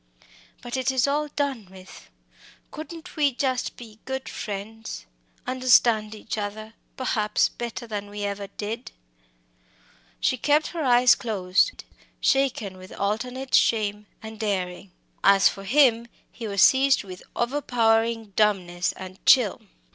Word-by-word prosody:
But 245 Hz, +1 st, -4 dB
it 260 Hz, +1 st, 0 dB
is 260 Hz, 0 st, +2 dB
all 295 Hz, +2 st, 0 dB
done 280 Hz, -8 st, -3 dB
with 185 Hz, 0 st, -14 dB, 0.6 s
couldn't 325 Hz, +2 st, -9 dB
we 290 Hz, -4 st, +2 dB
just 255 Hz, -1 st, -1 dB
be 220 Hz, -3 st, -12 dB
good 265 Hz, 0 st, -4 dB
friends 210 Hz, -, -6 dB, 0.4 s
understand 240 Hz, -4 st, +3 dB
each 215 Hz, +1 st, -5 dB
other, 215 Hz, +2 st, -6 dB, 0.2 s
perhaps, 215 Hz, -5 st, +1 dB
better 240 Hz, 0 st, -6 dB
than 205 Hz, -2 st, -5 dB
we 205 Hz, 0 st, -6 dB
ever 200 Hz, 0 st, -3 dB
did?" 220 Hz, +5 st, -6 dB, 1.3 s
She 255 Hz, -, +1 dB
kept 300 Hz, +3 st, +2 dB
her 340 Hz, -, -5 dB
eyes 245 Hz, -1 st, +6 dB
closed, 200 Hz, -, 0 dB, 0.4 s
shaken 245 Hz, -8 st, +1 dB
with 185 Hz, 0 st, -13 dB
alternate 250 Hz, +6 st, -3 dB
shame 210 Hz, -2 st, +2 dB, 0.2 s
and 220 Hz, 0 st, -9 dB
daring. 190 Hz, -3 st, -3 dB, 0.3 s
As 195 Hz, -1 st, +6 dB
for 195 Hz, -, -9 dB
him, 235 Hz, -1 st, +4 dB, 0.2 s
he 230 Hz, -, -7 dB
was 200 Hz, -1 st, +3 dB
seized 270 Hz, -1 st, +5 dB
with 185 Hz, -2 st, -10 dB
overpowering 230 Hz, -4 st, +1 dB
dumbness 185 Hz, -4 st, +1 dB
and 185 Hz, 0 st, -11 dB
chill. 245 Hz, -7 st, +5 dB
225 Hz, 130 wpm, -25 LUFS, 205-255 Hz, 1.3 s, eyes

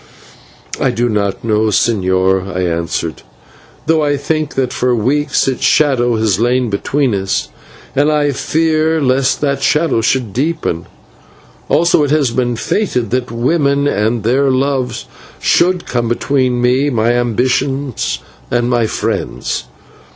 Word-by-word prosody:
"I -, -, +2 dB
do 120 Hz, +1 st, 0 dB
not 100 Hz, -3 st, -1 dB
know, 110 Hz, -1 st, +1 dB
señor," 95 Hz, -3 st, +1 dB
I -, -, 0 dB
answered, 85 Hz, -2 st, -2 dB, 0.6 s
"though 160 Hz, -1 st, +2 dB
I 145 Hz, -1 st, +1 dB
think 155 Hz, +1 st, -2 dB
that 130 Hz, -2 st, -1 dB
for 125 Hz, 0 st, +1 dB
weeks 135 Hz, +6 st, +1 dB
its 130 Hz, -, -1 dB
shadow 125 Hz, -5 st, +3 dB
has 110 Hz, -4 st, +1 dB
laid 120 Hz, 0 st, +1 dB
between 135 Hz, +5 st, 0 dB
us, 95 Hz, -1 st, -1 dB, 0.5 s
and 145 Hz, +2 st, +3 dB
I 145 Hz, -1 st, +2 dB
fear 160 Hz, +2 st, +1 dB
lest 130 Hz, -1 st, +1 dB
that 140 Hz, -2 st, 0 dB
shadow 150 Hz, -2 st, +2 dB
should 115 Hz, -3 st, 0 dB
deepen. 135 Hz, -, -2 dB, 0.8 s
Also 170 Hz, -2 st, +3 dB
it 145 Hz, -, 0 dB
has 145 Hz, -4 st, +2 dB
been 120 Hz, 0 st, 0 dB
fated 125 Hz, -, -1 dB
that 125 Hz, 0 st, -1 dB
women 140 Hz, +4 st, +1 dB
and 110 Hz, -2 st, 0 dB
their 135 Hz, +5 st, +2 dB
loves 130 Hz, -1 st, -1 dB, 0.3 s
should 180 Hz, 0 st, +2 dB
come 120 Hz, -2 st, -1 dB
between 125 Hz, +1 st, 0 dB
me, 125 Hz, +4 st, +2 dB
my 115 Hz, -2 st, +1 dB
ambitions, 125 Hz, -, 0 dB, 0.3 s
and 120 Hz, 0 st, 0 dB
my 120 Hz, -2 st, +2 dB
friends. -, -, -3 dB
125 Hz, 135 wpm, -15 LUFS, 115-145 Hz, 0.8 s, shadow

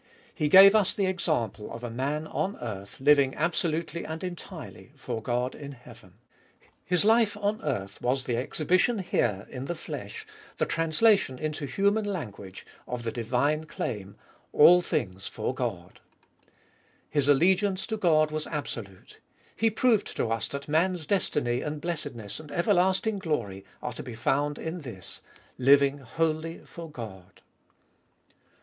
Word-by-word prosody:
He 155 Hz, -4 st, 0 dB
gave 195 Hz, +5 st, +9 dB
us 210 Hz, -3 st, +3 dB
the 200 Hz, -, +1 dB
example 155 Hz, -, -1 dB
of 115 Hz, -, -8 dB
a 120 Hz, -, -4 dB
man 140 Hz, +6 st, -2 dB
on 195 Hz, +5 st, -2 dB
earth 100 Hz, -4 st, -7 dB
living 140 Hz, -1 st, +4 dB
absolutely 165 Hz, 0 st, -1 dB
and 160 Hz, +3 st, -6 dB
entirely 175 Hz, -6 st, -8 dB
for 120 Hz, -4 st, -5 dB
God 125 Hz, +3 st, -1 dB
in 140 Hz, -1 st, -8 dB
heaven. 125 Hz, -2 st, -15 dB, 0.7 s
His 180 Hz, +2 st, +1 dB
life 220 Hz, -2 st, +4 dB
on 210 Hz, +1 st, -1 dB
earth 100 Hz, -9 st, -3 dB
was 130 Hz, +2 st, 0 dB
the 120 Hz, -, -1 dB
exhibition 170 Hz, -, +1 dB
here 115 Hz, -, 0 dB
in 130 Hz, 0 st, -5 dB
the 175 Hz, -, -3 dB
flesh, 440 Hz, -, -7 dB, 0.3 s
the -, -, +1 dB
translation 165 Hz, -, +2 dB
into 155 Hz, 0 st, -3 dB
human 200 Hz, +9 st, +2 dB
language, 105 Hz, -, -6 dB, 0.2 s
of 125 Hz, -1 st, -4 dB
the 115 Hz, -, -2 dB
divine 125 Hz, +7 st, 0 dB
claim 100 Hz, -9 st, -5 dB
— -, -, -29 dB
" -, -, -39 dB
All 180 Hz, +4 st, +9 dB
things 95 Hz, -, -2 dB
for 110 Hz, +3 st, -3 dB
God" 100 Hz, -9 st, -4 dB, 1.1 s
His 145 Hz, -2 st, 0 dB
allegiance 185 Hz, +6 st, +3 dB
to 220 Hz, -, -2 dB
God 155 Hz, -6 st, +3 dB
was 155 Hz, 0 st, -3 dB
absolute. 115 Hz, -, -6 dB, 0.4 s
He 225 Hz, -, +3 dB
proved 220 Hz, -1 st, +1 dB
to 115 Hz, -, 0 dB
us 115 Hz, -, -1 dB
that 140 Hz, 0 st, -6 dB
man's 165 Hz, +2 st, +1 dB
destiny 140 Hz, -9 st, 0 dB
and 150 Hz, 0 st, -4 dB
blessedness 145 Hz, -, -5 dB
and 155 Hz, -2 st, -11 dB
ever 175 Hz, +6 st, +2 dB
lasting 190 Hz, +3 st, +2 dB
glory 110 Hz, -, -3 dB, 0.2 s
are 125 Hz, -, -3 dB
to -, -, -6 dB
be 125 Hz, -3 st, -8 dB
found 145 Hz, +5 st, 0 dB
in 165 Hz, +2 st, -5 dB
this: 115 Hz, -, -9 dB, 0.4 s
Living 140 Hz, +2 st, +5 dB
wholly 160 Hz, +5 st, -2 dB
for 170 Hz, -1 st, -9 dB
God. 105 Hz, -10 st, -10 dB
150 Hz, 155 wpm, -28 LUFS, 120-180 Hz, 1.1 s, gave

